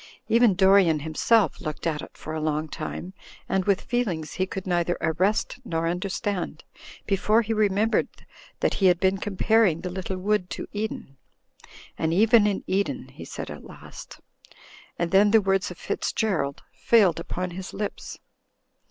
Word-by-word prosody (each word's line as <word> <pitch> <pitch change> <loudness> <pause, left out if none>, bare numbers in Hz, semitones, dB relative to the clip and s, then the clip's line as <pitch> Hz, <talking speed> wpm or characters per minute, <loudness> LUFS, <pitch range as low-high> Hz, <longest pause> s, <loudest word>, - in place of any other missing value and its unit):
Even 230 -4 +4
Dorian, 190 -5 +4
himself, 165 +5 +2
looked 155 +1 -5
at 155 -3 -1
it - - -12
for 155 - -7
a 160 - -3
long 155 0 -1
time, 165 +4 -6 0.3
and 190 -1 0
with 200 -2 +2
feelings 200 -12 -2
he 185 - -1
could 190 0 -6
neither 175 -1 0
arrest 190 +9 0
nor 165 -7 -2
understand, 185 +2 -3 0.4
before 210 +3 +2
he 225 +1 -2
remembered 215 +1 +2 0.5
that - - +2
he 195 - +3
had 175 -1 +4
been 190 0 +2
comparing 205 -3 +2
the 180 - -4
little 190 0 -4
wood 190 -1 0
to - - -6
Eden. 205 -10 -5 0.8
"And 160 +1 0
even 220 +1 +5
in 200 -2 -1
Eden," 195 +2 -2
he - - -11
said - - -7
at - - -9
last; - - -12 0.8
and 170 -1 -1
then 200 +2 +5
the 220 +2 +6
words 195 -1 0
of - - -9
Fitzgerald 170 - -2
failed 180 - +3
upon 180 +2 -4
his 185 +2 -7
lips. 205 0 -5
190 Hz, 160 wpm, -25 LUFS, 170-210 Hz, 0.8 s, the